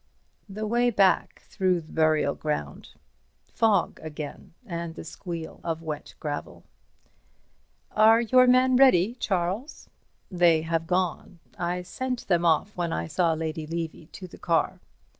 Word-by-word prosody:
The 215 +2 -5
way 240 +3 +2
back 200 -4 +2
through 185 -3 0
the 155 - -16
burial 155 -3 +2
ground. 110 - -4 0.6
Fog 215 -5 +2
again, 155 0 -8
and 170 -4 -5
the - - -8
squeal 165 0 -7
of 165 0 -3
wet 155 -2 -6
gravel. 145 -1 -5 1.3
"Are 220 +1 +6
your 255 +2 +4
men 255 0 +5
ready, 235 -6 +5
Charles?" 195 - -3 0.4
"They 170 -3 +3
have 165 0 -1
gone. 180 0 -1 0.2
I 180 +1 -2
sent 255 +6 -4
them 175 -2 +2
off 170 +5 +2
when 175 -2 -2
I 80 - -2
saw 165 - +1
Lady 160 -1 -4
Levy 165 -1 -5
to 185 +1 -10
the - - -14
car." 165 -2 0
175 Hz, 140 wpm, -26 LUFS, 160-210 Hz, 1.3 s, Are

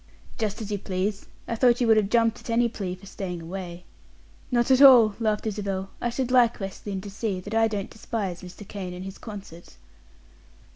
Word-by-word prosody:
"Just 215 0 -2
as 210 - -7
you 205 - -1
please. 195 +2 -3 0.2
I - - -2
thought 240 +1 +4
you 245 - +2
would 225 -1 +6
have 205 -2 +2
jumped 230 0 +2
at - - -12
any 235 +1 +3
plea 190 -5 -4
for 185 +2 -16
staying 185 -3 -5
away." 175 +1 -7 0.7
"Not 240 0 +2
at 260 +1 +5
all," 245 -6 +9
laughed 215 -2 0
Isabel. 195 -2 -3
"I 240 - 0
should 250 +1 -2
like 245 -2 +4
West 195 +1 -7
Lynne 195 -2 -3
to 200 0 -8
see 200 -2 -2
that 205 +4 -8
I 225 0 +4
don't 205 -3 -4
despise 210 -5 -4
Mr. 185 +2 -11
Kane 185 -3 -6
and 180 +1 -7
his 195 0 -8
concert." 195 -6 -10
205 Hz, 205 wpm, -26 LUFS, 190-230 Hz, 0.7 s, all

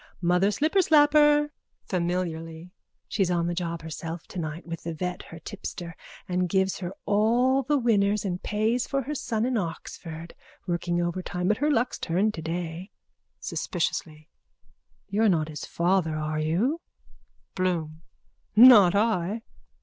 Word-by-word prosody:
Mother 180 +3 +3
Slipperslapper. 295 - +4 0.3
(Familiarly.) 170 -2 -3 0.4
She's 195 -4 0
on 170 -1 +1
the 175 - -1
job 170 -2 -3
herself 165 +1 -6
tonight 165 -1 -6
with 165 -1 -6
the 165 -1 -5
vet 180 +2 -3
her 165 - -11
tipster 170 -1 -7 0.3
that 180 0 0
gives 190 +1 +1
her 180 -1 -4
all 240 +6 +3
the 290 +3 +1
winners 210 -4 +2
and 180 -2 -2
pays 220 +4 0
for 275 -1 -1
her 295 +5 -4
son 230 -5 -1
in 255 -1 0
Oxford. 165 -2 -6 0.3
Working 175 0 -1
overtime 180 +1 -2
but 210 - +2
her 295 +3 +1
luck's 245 -3 0
turned 195 +6 +1
today. 165 +2 -5 0.5
(Suspiciously.) 155 -3 -3 0.8
You're 210 +2 +2
not 160 -4 +1
his 150 - -6
father, 170 -2 +1
are 155 0 -2
you? 200 - 0 0.7
BLOOM: 165 -4 -2 0.5
Not 215 -6 +9
I! 210 0 +1
180 Hz, 135 wpm, -26 LUFS, 170-225 Hz, 0.8 s, Not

